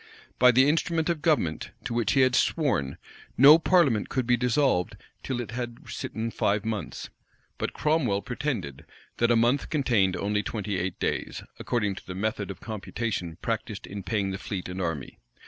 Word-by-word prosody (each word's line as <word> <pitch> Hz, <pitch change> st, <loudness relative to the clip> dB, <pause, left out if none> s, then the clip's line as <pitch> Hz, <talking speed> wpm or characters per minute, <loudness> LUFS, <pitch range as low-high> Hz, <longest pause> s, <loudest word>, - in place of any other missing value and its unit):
By 125 Hz, -, +7 dB
the 130 Hz, +3 st, +5 dB
instrument 160 Hz, +2 st, +1 dB
of 165 Hz, -3 st, -1 dB
government, 125 Hz, -, +1 dB
to -, -, -4 dB
which 115 Hz, -3 st, +1 dB
he 135 Hz, -, +4 dB
had 130 Hz, -1 st, +4 dB
sworn, 90 Hz, -, +1 dB, 0.4 s
no 145 Hz, +5 st, +9 dB
parliament 160 Hz, -, +3 dB
could 130 Hz, -1 st, -1 dB
be 125 Hz, +1 st, +4 dB
dissolved 125 Hz, -, +1 dB, 0.2 s
till 130 Hz, -2 st, -3 dB
it 120 Hz, -3 st, -5 dB
had 120 Hz, 0 st, -6 dB
sitten 115 Hz, +1 st, -4 dB
five 105 Hz, 0 st, 0 dB
months; 105 Hz, -9 st, -4 dB, 0.5 s
but -, -, -2 dB
Cromwell 135 Hz, -, +1 dB
pretended, 120 Hz, -, -4 dB, 0.3 s
that 120 Hz, -, +2 dB
a 120 Hz, -, +4 dB
month 120 Hz, +5 st, +2 dB
contained 115 Hz, -, +2 dB
only 105 Hz, +1 st, 0 dB
twenty 105 Hz, -3 st, -3 dB
eight 90 Hz, 0 st, -3 dB
days, -, -, -2 dB, 0.2 s
according 105 Hz, -5 st, 0 dB
to -, -, -12 dB
the 90 Hz, -, -6 dB
method 105 Hz, 0 st, -2 dB
of 95 Hz, -2 st, -7 dB
computation 110 Hz, -5 st, -4 dB
practised -, -, -3 dB
in 100 Hz, 0 st, -7 dB
paying 100 Hz, -1 st, -1 dB
the 95 Hz, -, -5 dB
fleet 95 Hz, -3 st, -5 dB
and 90 Hz, +1 st, -5 dB
army. 80 Hz, -6 st, -4 dB
115 Hz, 175 wpm, -27 LUFS, 100-130 Hz, 0.5 s, no